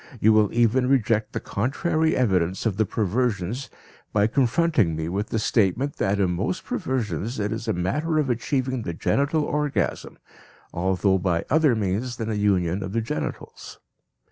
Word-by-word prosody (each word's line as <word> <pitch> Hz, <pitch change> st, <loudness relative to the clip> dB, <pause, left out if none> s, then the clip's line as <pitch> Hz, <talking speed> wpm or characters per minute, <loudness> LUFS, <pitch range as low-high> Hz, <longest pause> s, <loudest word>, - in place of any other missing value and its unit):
You 110 Hz, +1 st, +5 dB
will 105 Hz, -2 st, +3 dB
even 120 Hz, +2 st, +2 dB
reject 115 Hz, -4 st, +2 dB
the -, -, -3 dB
contrary 155 Hz, -, 0 dB
evidence 95 Hz, -6 st, +1 dB
of 105 Hz, -4 st, 0 dB
the 110 Hz, -1 st, +1 dB
perversions 110 Hz, +3 st, -1 dB, 0.4 s
by 105 Hz, -1 st, +3 dB
confronting 125 Hz, -, +2 dB
me 80 Hz, 0 st, -3 dB
with 100 Hz, +4 st, -2 dB
the -, -, -2 dB
statement 110 Hz, +5 st, +1 dB
that 100 Hz, +1 st, 0 dB
in 95 Hz, -3 st, +2 dB
most 100 Hz, -, -2 dB
perversions 130 Hz, -, -2 dB
it 105 Hz, 0 st, -1 dB
is 115 Hz, +1 st, -4 dB
a 110 Hz, -, +1 dB
matter 150 Hz, -, -1 dB
of 150 Hz, -2 st, +1 dB
achieving 130 Hz, +1 st, -1 dB
the 85 Hz, -6 st, -5 dB
genital 140 Hz, -, +1 dB
orgasm, 150 Hz, -1 st, -2 dB, 0.6 s
although 95 Hz, +2 st, +1 dB
by 85 Hz, -2 st, 0 dB
other 155 Hz, -4 st, +4 dB
means 110 Hz, +4 st, -2 dB
than 115 Hz, -1 st, -3 dB
a -, -, -1 dB
union 95 Hz, -3 st, +1 dB
of 95 Hz, +1 st, -5 dB
the 115 Hz, -, +1 dB
genitals. 95 Hz, -9 st, -6 dB
110 Hz, 165 wpm, -24 LUFS, 95-130 Hz, 0.6 s, You